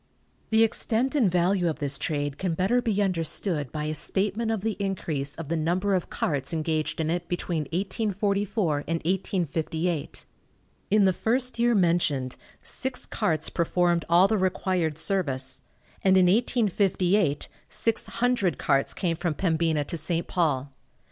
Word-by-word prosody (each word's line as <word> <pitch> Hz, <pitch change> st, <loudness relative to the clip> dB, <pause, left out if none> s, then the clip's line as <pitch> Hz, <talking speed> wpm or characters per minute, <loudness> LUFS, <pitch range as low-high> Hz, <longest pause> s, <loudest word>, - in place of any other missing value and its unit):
The 220 Hz, 0 st, +5 dB
extent 230 Hz, +3 st, 0 dB
and 245 Hz, -11 st, +3 dB
value 180 Hz, 0 st, +2 dB
of 155 Hz, -, -3 dB
this 140 Hz, -2 st, -1 dB
trade 145 Hz, -2 st, -2 dB
can 180 Hz, -4 st, -1 dB
better 195 Hz, +8 st, +2 dB
be 205 Hz, -4 st, +1 dB
understood 165 Hz, -, -1 dB
by 150 Hz, -, -4 dB
a 155 Hz, 0 st, -2 dB
statement 205 Hz, +7 st, +1 dB
of 220 Hz, -3 st, -1 dB
the 220 Hz, 0 st, -1 dB
increase 160 Hz, -8 st, -2 dB
of 165 Hz, -, -7 dB
the 165 Hz, -, -1 dB
number 175 Hz, +5 st, 0 dB
of 185 Hz, -2 st, -1 dB
carts 140 Hz, +1 st, -2 dB
engaged 155 Hz, -1 st, -1 dB
in 160 Hz, 0 st, 0 dB
it 175 Hz, 0 st, -2 dB
between 170 Hz, -3 st, -2 dB
1844 200 Hz, -, -1 dB
and 165 Hz, -, 0 dB
1858. 170 Hz, -3 st, -2 dB, 0.6 s
In 205 Hz, 0 st, +4 dB
the 190 Hz, -, +4 dB
first 250 Hz, +5 st, -1 dB
year 240 Hz, 0 st, +3 dB
mentioned 165 Hz, -8 st, +1 dB, 0.3 s
six 260 Hz, -1 st, -1 dB
carts 160 Hz, -8 st, -1 dB
performed 170 Hz, 0 st, +1 dB
all 175 Hz, +3 st, +6 dB
the 215 Hz, 0 st, +1 dB
required 185 Hz, -4 st, 0 dB
service, 140 Hz, -8 st, 0 dB, 0.4 s
and 190 Hz, -1 st, +5 dB
in 185 Hz, -, +5 dB
1858 195 Hz, -, +1 dB, 0.2 s
six 230 Hz, -1 st, 0 dB
hundred 230 Hz, -, 0 dB
carts 135 Hz, 0 st, +1 dB
came 170 Hz, -3 st, 0 dB
from 165 Hz, -2 st, -2 dB
Pembina 160 Hz, -3 st, +1 dB
to 170 Hz, -, -4 dB
St. 165 Hz, +2 st, -1 dB
Paul. 145 Hz, -6 st, -1 dB
175 Hz, 150 wpm, -26 LUFS, 160-200 Hz, 0.6 s, all